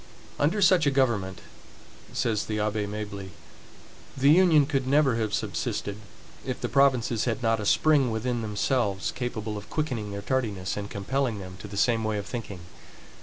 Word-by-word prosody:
"Under 180 +8 +2
such 180 -4 +5
a - - +6
government," 115 -9 0 0.7
says 110 -3 0
the 105 -1 -2
Abbe 105 0 -1
Mably, 100 -2 -6 0.9
"the 140 +2 +5
Union 165 -4 +6
could 135 -3 -1
never 140 -3 +3
have 110 -2 -1
subsisted, 100 -1 -2 0.5
if - - -4
the - - -2
provinces 130 -5 +2
had 120 0 -2
not 115 -1 +2
a 105 - -2
spring 150 -5 +4
within 115 +2 -2
themselves, 105 -1 0
capable 110 -4 -4
of 100 - -14
quickening 125 -9 -2
their 100 0 -5
tardiness, 105 -8 -1
and 100 0 -5
compelling 120 +3 -1
them 95 -2 -8
to - - -8
the 100 0 -8
same 115 +1 +2
way 110 -1 -1
of 100 - -4
thinking. 105 -6 -6
115 Hz, 170 wpm, -27 LUFS, 105-135 Hz, 0.9 s, a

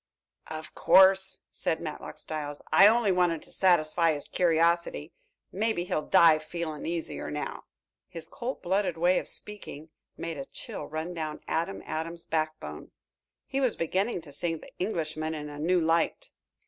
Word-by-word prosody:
"Of 155 0 -7
course," 190 +1 +5
said 160 - -1
Matlock 155 -2 -7
Styles. 145 -2 -6
"I 195 - +9
only 225 -2 +4
wanted 175 -3 +2
to - - -13
satisfy 165 -2 +3
his 145 - -6
curiosity. 170 -2 +1 0.4
Maybe 215 -2 0
he'll 175 - -1
die 160 0 +6
feeling 155 -1 -5
easier 165 -1 -3
now." 150 0 -5 0.4
His 165 -1 -7
cold 250 +2 -5
blooded 190 -1 0
way 175 +2 +3
of - - -7
speaking 175 -7 -4 0.3
made 165 -3 -5
a 135 - -5
chill - - -7
run 160 +3 -4
down 155 -3 -4
Adam 170 +4 -2
Adams' 165 +2 -4
backbone. 155 -1 -3 0.6
He 275 0 -2
was 255 -4 +2
beginning 185 +4 -1
to 155 -3 -12
see 165 +4 +1
the 160 - -12
Englishman 160 -4 -2
in 150 -1 -6
a 145 0 -8
new 175 +4 +2
light. 165 0 +1
165 Hz, 155 wpm, -28 LUFS, 155-180 Hz, 0.6 s, I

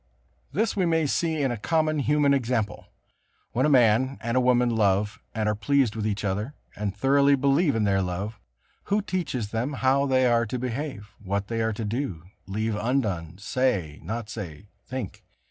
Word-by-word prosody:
This 220 +3 0
we 185 -3 +2
may 160 -1 +2
see 160 +1 0
in 135 - +1
a 120 - -2
common 155 +5 +1
human 145 0 +3
example. 120 -5 -1 0.6
When 130 +5 +2
a - - +2
man 130 0 +4
and 115 +1 -2
a - - +5
woman 125 -1 +3
love 105 0 +1 0.2
and 110 -1 0
are 105 - +2
pleased 125 +1 +1
with 110 -1 -1
each 105 -1 -2
other, 105 +9 -2 0.2
and 100 -1 -3
thoroughly 140 +4 +4
believe 140 +2 +2
in 110 - +1
their 100 -1 +2
love, 95 +4 -3 0.5
who 205 +1 +1
teaches 145 - -2
them 115 +6 -2
how 135 +1 +2
they 130 -1 +3
are 115 -2 +3
to 125 - -3
behave, 125 -3 -4
what 100 +1 -2
they 115 -1 -1
are 110 0 0
to 110 +1 -4
do, 105 - -3 0.2
leave 110 +2 -1
undone, 105 - -1
say, 100 - -1
not 115 0 -4
say, 100 -3 -8 0.2
think? 130 -7 -6
120 Hz, 180 wpm, -26 LUFS, 105-140 Hz, 0.6 s, a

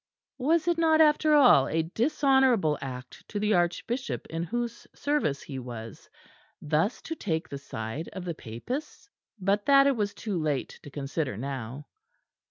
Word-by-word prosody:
Was 315 +5 +2
it 340 -1 +2
not 320 -1 +4
after 305 0 +5
all 250 - +7
a 160 0 0
dishonourable 245 - +3
act 125 -2 -8
to 205 - -3
the 210 +1 +2
Archbishop 195 +8 -1
in 165 0 -2
whose 235 +6 -4
service 285 - 0
he 135 -3 -6
was, 115 -3 -9 0.5
thus 155 +9 0
to 325 - -4
take 165 - -2
the 140 - -6
side 115 +4 -5
of 185 -2 -6
the 170 - -2
Papists? 235 - -6 0.3
But 200 +2 0
that 275 -1 +7
it 280 -1 +3
was 205 -3 -2
too 200 -7 -3
late 150 -4 -2
to - - -10
consider 140 -4 -3
now. 135 +2 -5
180 Hz, 160 wpm, -28 LUFS, -, 0.5 s, all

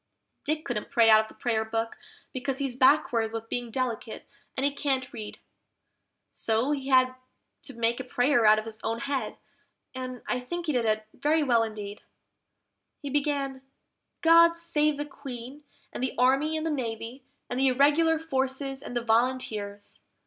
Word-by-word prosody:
Dick 310 +2 -1
couldn't 225 -9 -3
pray 230 -5 +5
out 215 - +8
of 220 - -8
the - - -16
Prayer 225 -3 0
book, 225 +1 -3 0.4
because 265 +1 -2
he's 270 -3 -2
backward 255 -4 +3
with 225 0 -6
being 245 -1 -3
delicate, 230 -2 -4 0.3
and 265 - +1
he 285 - +1
can't 265 -3 -1
read; 215 -3 -7 1.0
So 225 +5 0
he 275 -2 -2
had 255 -1 +4 0.5
to 270 - -9
make 235 +1 0
a - - -3
prayer 245 0 +2
out 215 0 +7
of 215 - -3
his 220 -1 -8
own 225 +1 -2
head, 275 -5 -3 0.6
and 255 -1 -6
I 250 - 0
think 345 +8 -5
he 310 - 0
did 245 -2 +1
it 215 0 0
very 310 +1 +1
well 240 -5 +3
indeed. 210 -2 -5 1.0
He 285 - -4
began, 280 -2 -1 0.6
"GOD 335 +1 +6
save 305 -3 +1
the 290 - -3
Queen, 275 0 -9 0.3
and - - -5
the 260 - -2
Army 270 +5 +3
and 315 - -3
the 325 - 0
Navy, 240 -1 -4 0.2
and 245 - -3
the 270 - +4
Irregular 295 +5 +4
Forces 270 -3 -2
and 245 - -5
the 240 - -2
Volunteers! 220 -4 -1
255 Hz, 170 wpm, -27 LUFS, 230-285 Hz, 1.0 s, out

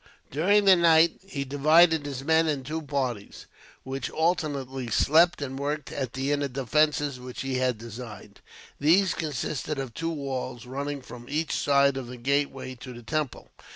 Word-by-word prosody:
During 200 +8 +3
the 190 -1 +8
night, 165 -1 +4
he 140 -8 -4
divided 155 +3 +4
his 135 -2 -5
men 160 +2 +3
in 145 -4 -1
two 155 +4 -4
parties, 130 -8 -4 0.4
which 135 -1 -4
alternately 140 -7 -1
slept 160 +7 +4
and 135 -1 -5
worked 145 0 -3
at 130 -4 -4
the 135 +2 -2
inner 145 -1 0
defences 145 +1 0
which 125 0 -7
he 135 -1 -2
had 125 -2 +1
designed. 115 -3 -10 0.4
These 175 +6 +4
consisted 150 0 -3
of 135 -4 -5
two 165 +5 -3
walls, 130 -5 -4
running 140 +2 -4
from 120 0 -11
each 155 +2 -1
side 140 -1 +3
of 130 -2 -5
the 125 +1 -8
gateway 135 +1 -1
to 130 - -8
the 120 - -11
temple. 150 +1 -3
140 Hz, 165 wpm, -27 LUFS, 130-155 Hz, 0.4 s, the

